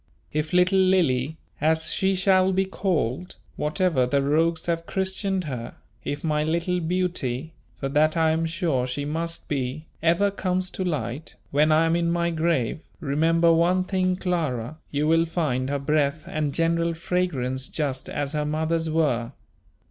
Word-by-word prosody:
If 155 +1 -1
little 180 +2 +4
Lily, 160 -7 +2 0.2
as 160 +1 +2
she 190 0 +1
shall 190 0 +4
be 190 +1 +2
called, 180 - -2 0.2
whatever 150 -4 +1
the 140 +2 +1
rogues 160 +3 +1
have 170 -1 -2
christened 190 0 -1
her, 125 -6 -6 0.3
if 145 - -4
my 150 -2 +1
little 170 +3 0
beauty 165 -5 -2 0.2
for 135 - -3
that 155 +3 +2
I 160 -1 +3
am 165 +1 0
sure 160 -7 0
she 140 +3 -3
must 165 +3 -3
be 140 +2 -3 0.2
ever 170 +5 +3
comes 185 -1 -2
to 190 - -3
light, 145 - -3 0.2
when 150 +2 +3
I 155 +1 +4
am 165 +1 +2
in 170 0 +1
my 170 0 +1
grave, 160 -5 0 0.2
remember 165 +2 +3
one 175 +3 +3
thing, 185 -1 0
Clara, 155 -7 -2
you 150 +1 0
will 165 +1 +4
find 140 -6 -1
her 140 - 0
breath 150 +1 0
and 150 -2 -2
general 165 +2 +1
fragrance 135 -7 -1
just 135 -4 -3
as 145 0 -3
her 150 -1 0
mother's 160 +2 -1
were. 140 -6 0
160 Hz, 160 wpm, -25 LUFS, 145-175 Hz, 0.3 s, little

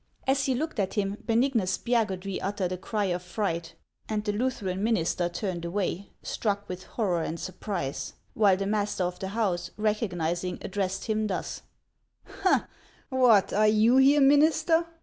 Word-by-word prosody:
As 270 0 +2
he 260 - +2
looked 310 -2 -3
at 190 -2 -1
him, 200 -1 -1
Benignus 230 -5 +2
Spiagudry 195 -5 -1
uttered 195 -2 -2
a 185 - -2
cry 210 +2 -2
of 180 -1 -1
fright, 175 -3 -3 0.3
and 215 -1 -1
the 205 - +1
Lutheran 205 -5 -2
minister 175 -5 +1
turned 175 -1 -4
away, 185 +1 -2
struck 205 -2 -2
with 185 +1 -6
horror 185 -7 -1
and 165 +1 -3
surprise; 185 -6 -4 0.2
while 200 -4 +4
the 195 - -2
master 205 -2 0
of 180 0 -3
the 190 - -3
house, 195 -4 -1
recognizing, 180 -5 -1
addressed 195 -1 -2
him 215 -1 0
thus: 190 - -4 0.7
" 395 - -13 0.7
What, 250 -7 +4
are 215 +1 +4
you 220 +4 +5
here, 280 +2 +6
minister! 315 +4 +4
205 Hz, 155 wpm, -27 LUFS, 185-230 Hz, 0.7 s, here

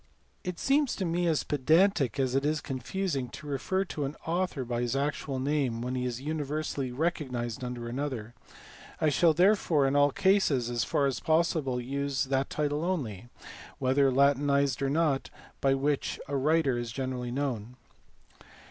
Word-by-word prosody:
It 180 -3 -4
seems 280 -1 +2
to 190 - -2
me 175 +1 0
as 160 -3 +1
pedantic 150 - +2
as 130 -2 +1
it 135 +1 +1
is 150 +1 +1
confusing 140 0 -3
to 150 - -10
refer 185 +7 -1
to 150 -5 -4
an 140 +2 -3
author 170 -5 -1
by 120 0 -2
his 120 +1 -1
actual 140 -1 -2
name 130 -4 0
when 125 +1 -3
he 125 -1 -1
is 120 -1 -3
universally 150 -2 -3
recognized 130 -5 -2
under 125 -1 -5
another: 120 -3 -4 0.7
I 155 - +3
shall 160 +2 +4
there 190 +6 +6
fore 155 -8 +1
in 135 +1 +1
all 145 0 +5
cases 145 - +2
as 120 -1 0
fa,r 140 - +1
as 135 -2 0
possible 160 -5 +1
use 140 +1 -1
that 135 0 0
title 150 +1 -1
only, 120 - -3 0.5
whether 135 +1 +3
latinized 140 0 +3
or 135 - +1
not, 145 -2 +1 0.3
by 135 0 +3
which 140 +1 -1
a 140 - -3
writer 140 -2 +2
is 120 -1 -4
generally 130 -1 -3
known. 125 -3 -3
140 Hz, 165 wpm, -29 LUFS, 130-155 Hz, 0.7 s, there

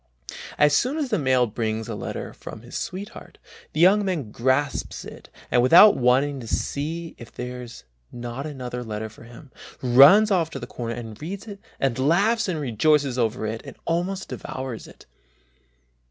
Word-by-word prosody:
As 150 0 +4
soon 260 - +1
as 290 -4 -2
the 215 - +1
mail 130 -3 +3
brings 110 0 -3
a - - -4
letter - - -6
from 110 - -10
his 120 - -11
sweetheart, 195 +2 -7 0.3
the - - -4
young 195 +5 +5
man 165 - -3
grasps 130 +5 -1
it - - -12 0.2
and 120 - +4
without 170 - +8
waiting 135 +3 +2
to 115 - -9
see 160 +8 -3
if 115 - -11
there 125 0 -6
is 120 -1 -11 0.3
not 120 +4 -6
another 125 -4 -6
letter 110 -1 -5
for 110 +2 -15
him, 120 +4 -14 0.3
runs 140 - +7
off 170 -4 +2
to 140 - -7
a 120 - -6
corner 115 -1 -5
and 115 -3 -9
reads 195 +7 -6 0.3
and 130 -2 0
laughs 200 - +2
and 175 -4 -2
rejoices 140 +1 +1
over 115 -1 0
it 110 +1 -4
and - - -11
almost 180 +3 -2
devours 130 -3 -6
it. - - -16
135 Hz, 170 wpm, -24 LUFS, 120-170 Hz, 0.3 s, without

